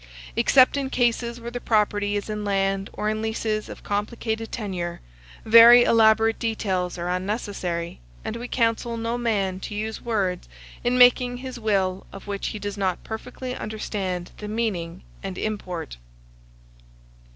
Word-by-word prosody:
Except 260 +1 +5
in 275 -1 -1
cases 240 -1 0
where 235 0 -7
the 245 0 -5
property 205 -2 +1
is 205 - -2
in 210 -1 -4
land 195 -1 0
or 210 - -3
in 215 0 -1
leases 220 -1 -2
of - - -10
complicated 220 +2 -3
tenure, 180 -6 -4 0.5
very 230 +2 +9
elaborate 225 -1 +4
details 190 -6 -1
are 175 0 -3
unnecessary; 180 -2 -3 0.3
and - - -3
we 240 +1 -5
counsel 230 0 0
no 230 +1 -2
man 205 -6 0
to 205 - -6
use 220 +1 -4
words 195 -6 -1 0.3
in 245 +1 +2
making 245 0 +5
his 255 -1 -7
will 195 -4 0
of 195 - -10
which 200 -1 -3
he - - -4
does 205 0 -5
not 185 -2 -1
perfectly 250 +3 -6
understand 195 -4 -4
the 210 - -7
meaning 190 -6 -3 0.2
and 190 -1 -5
import. 180 - -4
215 Hz, 150 wpm, -24 LUFS, 195-230 Hz, 0.5 s, very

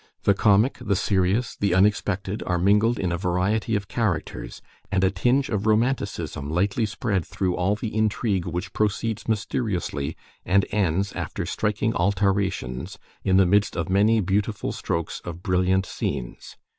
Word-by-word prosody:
The 100 - +5
comic, 105 +6 +3
the 105 -4 0
serious, 100 +4 +1
the 100 -3 +1
unexpected, 100 0 +1
are 90 - +1
mingled 105 +6 +3
in 90 -2 -1
a 85 - -1
variety 100 +5 0
of 100 -1 -2
characters, 105 -10 -2 0.3
and 95 -2 +1
a 95 - +3
tinge 125 +9 +2
of 105 0 -2
romanticism 100 - 0
lightly 95 +7 +1
spread 105 -3 -1
through 90 0 -2
all 95 +3 +1
the 105 0 -5
intrigue 105 -4 0
which 90 +3 -4
proceeds 110 +1 -1
misteriously, 100 - -2 0.3
and 100 +2 +3
ends, 100 -1 0
after - - -4
striking 110 +1 -1
altarations, 95 -5 0 0.3
in 95 -1 +3
the 95 - +6
midst 100 +3 +2
of 85 +2 -2
many 105 +4 +4
beautiful 100 +3 -1
strokes 85 -1 -3
of 90 0 -8
brilliant 95 +1 +2
scenes. 65 -8 -5
100 Hz, 150 wpm, -24 LUFS, 90-105 Hz, 0.3 s, the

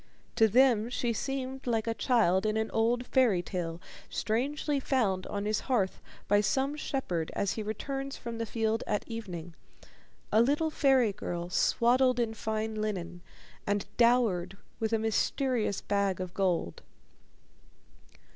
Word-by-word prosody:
To 225 -2 +5
them 235 -1 +4
she 240 -1 -1
seemed 265 +2 -4
like 225 -2 +1
a 230 - 0
child 215 -6 +2
in 215 0 0
an 220 0 -1
old 235 +2 +1
fairy 230 -11 +3
tale 170 -3 -4 0.3
strangely 280 +6 -1
found 215 -9 0
on 200 0 -3
his 215 0 +1
hearth 205 -7 +1 0.3
by 205 0 +4
some 270 +7 0
shepherd 185 - -2
as 200 - 0
he 220 - -4
returns 270 +6 -4
from 235 -1 -6
the 230 - -2
fields 225 0 0
at 210 - -1
evening 180 -8 -6 0.8
a 220 - +5
little 295 +6 +2
fairy 265 -8 +3
girl 175 -3 -5
swaddled 250 +5 +3
in 230 -2 0
fine 220 0 -2
linen, 180 -5 -4 0.5
and 205 0 0
dowered 230 -7 +3 0.2
with 220 0 -1
a 225 - +3
mysterious 225 0 0
bag 200 -2 0
of 185 -1 -5
gold. 180 - -1
220 Hz, 145 wpm, -30 LUFS, 200-250 Hz, 0.8 s, To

